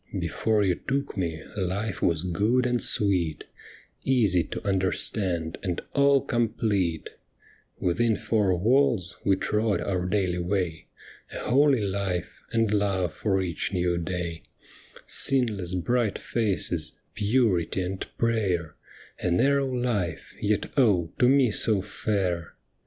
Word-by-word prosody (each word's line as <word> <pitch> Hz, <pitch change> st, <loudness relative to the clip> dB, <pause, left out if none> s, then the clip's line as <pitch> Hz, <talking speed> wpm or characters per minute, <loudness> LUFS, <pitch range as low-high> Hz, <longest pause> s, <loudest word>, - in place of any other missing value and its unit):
Before 110 Hz, -2 st, 0 dB
you 95 Hz, -2 st, +2 dB
took 140 Hz, -1 st, -1 dB
me, 85 Hz, -5 st, -3 dB
hfe 100 Hz, +1 st, -2 dB
was 85 Hz, -1 st, +1 dB
good 105 Hz, +8 st, +1 dB
and 120 Hz, -1 st, 0 dB
sweet, 90 Hz, -6 st, +1 dB, 0.6 s
Easy 105 Hz, -10 st, +3 dB
to -, -, -6 dB
understand 95 Hz, -3 st, 0 dB
and 90 Hz, -3 st, -2 dB
all 140 Hz, -1 st, +4 dB
complete; 105 Hz, -9 st, -1 dB, 0.7 s
Within 110 Hz, +6 st, +1 dB
four 105 Hz, -5 st, +1 dB
walls 115 Hz, -2 st, +2 dB
we 100 Hz, -, +3 dB
trod 105 Hz, +2 st, 0 dB
our 90 Hz, -2 st, -2 dB
daily 90 Hz, -2 st, 0 dB
way, 90 Hz, -3 st, -2 dB, 0.5 s
A -, -, -5 dB
holy 135 Hz, 0 st, +3 dB
life 95 Hz, -3 st, -3 dB
and 115 Hz, -2 st, +1 dB
love 95 Hz, -5 st, 0 dB
for 95 Hz, -3 st, 0 dB
each 85 Hz, +2 st, -3 dB
new 90 Hz, -1 st, 0 dB
day: 85 Hz, -1 st, -4 dB, 0.6 s
Sinless 105 Hz, -9 st, +1 dB
bright 110 Hz, +5 st, 0 dB
faces, 95 Hz, -7 st, -1 dB, 0.2 s
purity 100 Hz, -5 st, +1 dB
and 95 Hz, +1 st, -4 dB
prayer, 95 Hz, -9 st, 0 dB, 0.5 s
A 90 Hz, -, -1 dB
narrow 135 Hz, +8 st, +2 dB
life, 115 Hz, -10 st, -2 dB
yet 105 Hz, -1 st, 0 dB
oh, 100 Hz, -10 st, +3 dB
to 125 Hz, -, +5 dB
me 135 Hz, -4 st, +4 dB
so 105 Hz, 0 st, +2 dB
fair 90 Hz, -4 st, -2 dB
100 Hz, 125 wpm, -26 LUFS, 90-115 Hz, 0.7 s, to